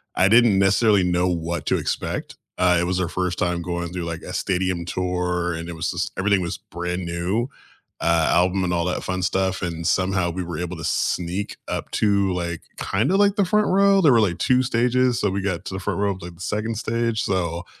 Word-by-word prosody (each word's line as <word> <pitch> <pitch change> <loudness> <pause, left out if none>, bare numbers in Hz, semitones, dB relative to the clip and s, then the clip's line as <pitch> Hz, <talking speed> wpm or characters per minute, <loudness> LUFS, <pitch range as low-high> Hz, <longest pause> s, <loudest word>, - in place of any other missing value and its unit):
I 95 - +4
didn't 115 -2 +5
necessarily 100 +1 +4
know 90 0 +1
what 85 -2 -3
to - - +2
expect, - - -3 0.2
uh, 90 -1 +4
it - - +1
was 90 +1 -1
their 90 -2 0
first 90 0 -2
time 90 -1 0
going 85 0 -4
through, 90 -1 -3
like, 85 -1 -5
a - - -8
stadium 90 -2 -1
tour, 90 -1 -1
and 85 +1 -6
it - - -5
was 80 -1 -2
just - - -2
everything 100 0 +2
was 85 - -3
brand 90 +1 -5
new, 90 +8 -1 0.5
uh, 85 -1 +3
album 90 +2 +2
and 90 - -1
all 85 0 +1
that 90 - -2
fun 95 0 -2
stuff, 95 0 0
and 85 -2 -4
somehow 95 +1 +1
we 95 +2 -4
were 85 -2 -5
able 90 +1 -4
to 80 - -8
sneak 90 +3 -1
up - - -4
to, 100 -3 +2
like, 85 -2 -3 0.2
kinda 120 - 0
like 200 0 +4
the 200 - +2
front 210 +3 +2
row, 195 +1 +4
there 155 -6 +6
were, 120 - +5
like, 90 -5 +1
2 130 -1 +3
stages, 125 0 +2
so, 105 - +1
we 100 +1 -2
got 95 -3 -2
to - - -5
the - - -3
front 95 - -3
row 100 -1 +1
of, 95 -1 -7
like, 85 0 -9
the 85 - -15
2nd 105 +3 -2
stage 115 0 -1
so, 85 -3 -1
90 Hz, 225 wpm, -23 LUFS, 85-105 Hz, 0.5 s, there